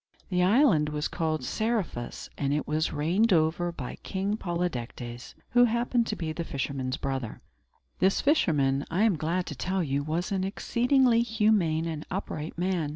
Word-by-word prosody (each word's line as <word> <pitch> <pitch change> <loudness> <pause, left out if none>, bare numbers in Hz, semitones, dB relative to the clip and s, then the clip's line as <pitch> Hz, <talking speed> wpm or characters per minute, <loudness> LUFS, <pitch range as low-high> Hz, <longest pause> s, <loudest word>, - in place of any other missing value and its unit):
The 180 -1 +1
island 185 - +4
was 150 0 -2
called 155 -1 -2
Seriphus, 215 - -2
and 140 -1 -1
it 150 - -2
was 155 +1 0
reigned 180 +10 +2
over 170 +1 +2
by 135 -7 -7
King 195 +2 -2
Polydectes, 125 - -4 0.2
who 245 0 +6
happened 235 0 +1
to 215 - -2
be 165 -5 -3
the 170 - -3
fisherman's 135 -2 -3
brother. 135 -6 -3 0.6
This 190 +1 +3
fisherman, 145 - +2
I 180 +6 +1
am 220 -5 +4
glad 170 +4 -1
to 150 - -6
tell 185 +7 -1
you, 140 -2 0
was 165 +5 -2
an 190 -1 0
exceedingly 240 +4 +2
humane 210 -8 +2
and 160 -2 -4
upright 165 -5 -4
man. 175 -4 0
170 Hz, 160 wpm, -28 LUFS, 150-210 Hz, 0.6 s, who